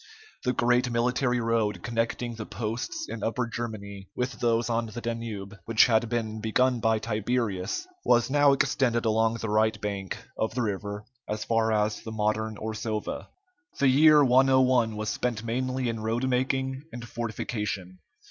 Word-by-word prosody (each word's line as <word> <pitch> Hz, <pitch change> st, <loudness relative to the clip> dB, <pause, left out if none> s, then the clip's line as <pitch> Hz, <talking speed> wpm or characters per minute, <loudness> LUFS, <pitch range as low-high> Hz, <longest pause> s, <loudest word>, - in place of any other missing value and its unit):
The 125 Hz, -, +2 dB
great 125 Hz, +1 st, +2 dB
military 125 Hz, +1 st, +1 dB
road 115 Hz, -2 st, 0 dB
connecting 120 Hz, +1 st, -1 dB
the 110 Hz, -1 st, -6 dB
posts 120 Hz, -, -4 dB
in 115 Hz, -, -6 dB
Upper 115 Hz, +3 st, 0 dB
Germany 100 Hz, -5 st, -6 dB
with 125 Hz, +1 st, -3 dB
those 115 Hz, -1 st, +2 dB
on 115 Hz, -1 st, 0 dB
the 110 Hz, +2 st, -7 dB
Danube, 115 Hz, -4 st, -5 dB
which 115 Hz, -1 st, +5 dB
had 115 Hz, -1 st, +2 dB
been 110 Hz, -2 st, -2 dB
begun 125 Hz, +3 st, +2 dB
by 110 Hz, 0 st, +2 dB
Tiberius, 110 Hz, -, -1 dB, 0.2 s
was 120 Hz, -1 st, +4 dB
now 145 Hz, +1 st, +5 dB
extended 125 Hz, -3 st, +1 dB
along 110 Hz, +1 st, +2 dB
the 115 Hz, -1 st, -4 dB
right 110 Hz, +1 st, +2 dB
bank 100 Hz, -2 st, -4 dB, 0.2 s
of 110 Hz, +1 st, -1 dB
the 125 Hz, -, +1 dB
river 105 Hz, 0 st, -3 dB, 0.2 s
as 105 Hz, 0 st, -2 dB
far 115 Hz, -1 st, +1 dB
as 105 Hz, 0 st, +1 dB
the 110 Hz, -, -7 dB
modern 110 Hz, 0 st, -1 dB
Orsova. 110 Hz, 0 st, -4 dB, 0.5 s
The 140 Hz, -, +4 dB
year 150 Hz, +2 st, +7 dB
101 130 Hz, -3 st, +4 dB
was 105 Hz, 0 st, -2 dB
spent 115 Hz, 0 st, -2 dB
mainly 130 Hz, +2 st, -1 dB
in 115 Hz, -1 st, -2 dB
roadmaking 130 Hz, +3 st, 0 dB
and 120 Hz, 0 st, -7 dB
fortification. 105 Hz, -5 st, -4 dB
115 Hz, 155 wpm, -27 LUFS, 110-125 Hz, 0.5 s, year